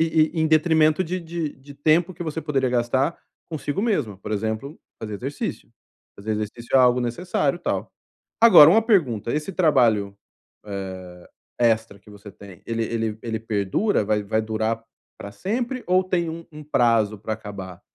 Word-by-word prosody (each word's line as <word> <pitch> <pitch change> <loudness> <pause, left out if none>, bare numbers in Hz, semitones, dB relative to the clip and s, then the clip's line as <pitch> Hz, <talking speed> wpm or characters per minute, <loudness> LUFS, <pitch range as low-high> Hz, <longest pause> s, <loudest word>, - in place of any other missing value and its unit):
e 160 -1 +3
e 160 - -1
em 160 - +3
detrimento 155 +1 +3
de 180 +3 -3
de 165 -2 -4
de 140 +1 -14
tempo 165 +5 +2
que - - -6
você 160 0 -4
poderia 135 -4 0
gastar 130 +6 0 0.3
consigo 155 +3 -3
mesma. 150 - 0
Por 105 +2 -7
exemplo, 110 +7 -3 0.2
fazer 105 -1 -5
exercício. 135 +6 -5 0.5
Fazer 110 +2 -4
exercício 110 +4 -5
é - - +7
algo 125 -1 +5
necessário, 140 +5 -1
tal. - - -3 0.5
Agora, 175 -10 +10
uma 220 +6 +5
pergunta: 145 - +1
esse 155 +6 -3
trabalho, 120 - +2 0.5
eh, 100 -1 -4 0.7
extra 110 -3 +1
que 105 - -18
você 100 0 -12
tem, 95 -2 -14
ele 115 0 -2
ele 110 -1 -3
ele 110 -1 -3
perdura? 105 - 0
Vai 105 0 0
vai 110 +2 0
durar 110 +1 -2 0.4
para 100 - -8
sempre 240 - -3
ou 185 +1 +3
tem 175 -3 -1
um 165 +1 -6
um 150 0 -9
prazo 115 -6 +2
para 110 +2 -4
acabar? 100 -4 -9
125 Hz, 165 wpm, -23 LUFS, 110-160 Hz, 0.7 s, Agora